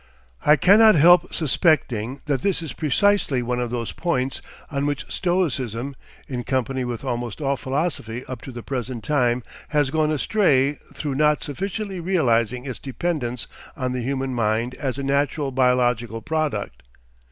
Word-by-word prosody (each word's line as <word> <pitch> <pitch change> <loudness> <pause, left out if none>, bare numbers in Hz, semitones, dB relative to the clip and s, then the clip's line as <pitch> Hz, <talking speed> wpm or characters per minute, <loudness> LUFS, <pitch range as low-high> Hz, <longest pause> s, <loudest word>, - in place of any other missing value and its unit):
I 150 - +6
cannot 210 - +6
help 175 +3 +6
suspecting 135 - +1
that 140 -3 0
this 195 -4 0
is 150 -6 -5
precisely 155 -3 +2
one 125 +1 -1
of 120 -1 -1
those 120 -1 -3
points 135 -6 -1 0.3
on 140 0 0
which 145 -2 -2
Stoicism, 140 - -1 0.3
in 125 -2 -4
company 130 0 -1
with 120 +1 -4
almost 120 -4 -3
all 140 -2 0
philosophy 130 -4 -3
up 130 -2 -7
to 135 - -8
the 120 -1 -8
present 125 -3 -4
time, 125 -4 +1 0.2
has 145 -3 +1
gone 155 0 +2
astray 145 -4 +2 0.2
through 145 -3 -3
not 150 +2 +2
sufficiently 195 - -4
realising 125 - +1
its 130 -3 -5
dependence 130 -3 -3 0.3
on 130 -3 -1
the 125 -1 -2
human 135 +1 -2
mind 115 +1 0
as 130 -1 -3
a 140 - -3
natural 140 +1 0
biological 125 -3 +1
product. 155 -9 -2
135 Hz, 150 wpm, -23 LUFS, 125-155 Hz, 0.3 s, I